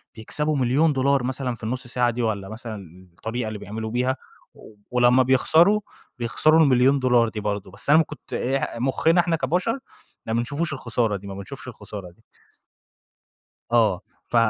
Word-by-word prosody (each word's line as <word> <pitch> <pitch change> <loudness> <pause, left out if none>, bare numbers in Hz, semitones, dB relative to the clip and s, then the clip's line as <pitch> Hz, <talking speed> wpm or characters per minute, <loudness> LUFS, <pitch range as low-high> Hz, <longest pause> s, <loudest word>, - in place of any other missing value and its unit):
بيكسبوا 150 +7 -2
1.000.000$ 135 0 +2
مثلًا 130 -1 -2
في 115 - -18
النُّص 125 +3 -3
ساعة 120 0 +1
دي، 120 - -3
والّا 100 -4 -2
مثلًا 100 -5 -9
الطريقة 110 +5 -4
اللي 110 -1 -5
بيعملوا 110 +2 -5
بيها، 125 +2 +1 0.8
ولمّا 125 +1 +5
بيخسروا، 160 +10 +4 0.4
بيخسروا 155 +7 +3
ال1.000.000$ 130 -3 +4
دي 110 - -6
برضه، 100 -2 -3
بس 100 +8 -9
أنا 150 - +7
ما - - +4
كنت 155 0 -12
إيه 135 +2 0
مُخّنا 160 +7 +3
إحنا 170 -1 0
كبشر، 180 - 0 0.5
ما 110 - -1
بنشوفوش 145 +7 -1
الخسارة 115 -4 -1
دي، 100 +1 -11
ما 100 - -6
بنشُفش 100 -1 -9
الخسارة 100 -4 -8
دي. - - -28 1.5
آه 110 -6 +3 0.3
ف - - -5
125 Hz, 155 wpm, -24 LUFS, 110-140 Hz, 1.5 s, أنا